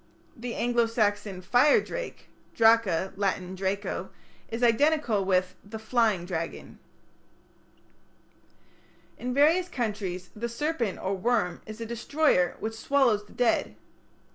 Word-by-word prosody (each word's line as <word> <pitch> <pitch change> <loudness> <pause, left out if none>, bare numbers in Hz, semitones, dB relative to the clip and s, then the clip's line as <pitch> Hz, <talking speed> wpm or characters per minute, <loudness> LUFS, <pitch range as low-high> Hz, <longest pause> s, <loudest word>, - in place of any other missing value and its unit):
The 235 0 -6
Anglo 240 -1 +1
Saxon 205 -4 -1
"fire 250 +10 +5
drake" - - -6 0.3
("draca", 225 -6 +3
Latin 190 -2 -1
"draco") 195 +2 -3 0.4
is 230 +2 -4
identical 240 -3 +3
with 185 -1 +1
the 210 +2 -8
"flying 220 -5 +1
dragon". 165 -2 -5 2.4
In 250 - -3
various 320 +7 +3
countries 205 - -4
the 235 +3 -4
serpent 240 - -2
or 190 - -2
worm 205 -2 0
is 215 +1 -8
a 230 - -4
destroyer 235 - +1
which 220 +1 -3
swallows 225 -3 +1
the - - -17
dead. 245 -2 +1
225 Hz, 115 wpm, -27 LUFS, 195-245 Hz, 2.4 s, fire